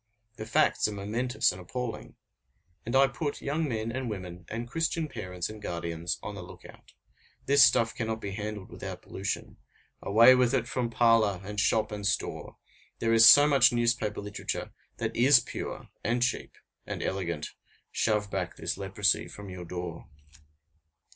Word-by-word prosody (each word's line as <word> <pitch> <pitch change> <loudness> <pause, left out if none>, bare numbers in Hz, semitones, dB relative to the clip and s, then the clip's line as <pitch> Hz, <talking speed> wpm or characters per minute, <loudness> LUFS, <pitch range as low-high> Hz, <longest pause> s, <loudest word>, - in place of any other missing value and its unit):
The 110 - -7
facts 115 - +2
are - - -4
momentous 115 +6 0
and 90 - -9
appalling. 120 +6 -6 0.7
And 120 - -1
I 135 +1 +7
put 145 +2 -3
young 150 +2 -2
men 110 -1 -2
and 130 0 -3
women 90 -4 -7
and 115 +2 -4
Christian 165 +3 -1
parents 90 - -5
and 110 0 -10
guardians 85 -1 -3
on - - -5
the - - -7
look - - -12
out. - - -16 0.5
This 140 -1 +6
stuff 115 -3 +4
cannot 110 -2 -3
be 100 -2 -5
handled 105 -1 -6
without - - -7
pollution. - - -5 0.4
Away 115 +5 +7
with 125 0 +3
it 120 -2 0
from 125 -1 -2
parlor, 115 -5 +3
and 105 +2 -5
shop, 110 0 +2
and 105 -1 -5
store! 100 - -2 0.4
There 115 0 +1
is 115 0 +8
so 145 +4 +9
much 140 -4 +5
newspaper 120 -3 0
literature 105 0 -5 0.2
that - - -3
is 130 +2 +6
pure, - - -7
and 120 +2 +1
cheap, 130 - -2 0.3
and - - -4
elegant; 85 -5 -3 0.4
shove 105 -2 0
back 95 -3 -3
this - - -4
leprosy 100 +2 +1
from 100 -2 -10
your 90 -1 -8
door. 85 -1 -6
110 Hz, 165 wpm, -28 LUFS, 100-120 Hz, 0.7 s, so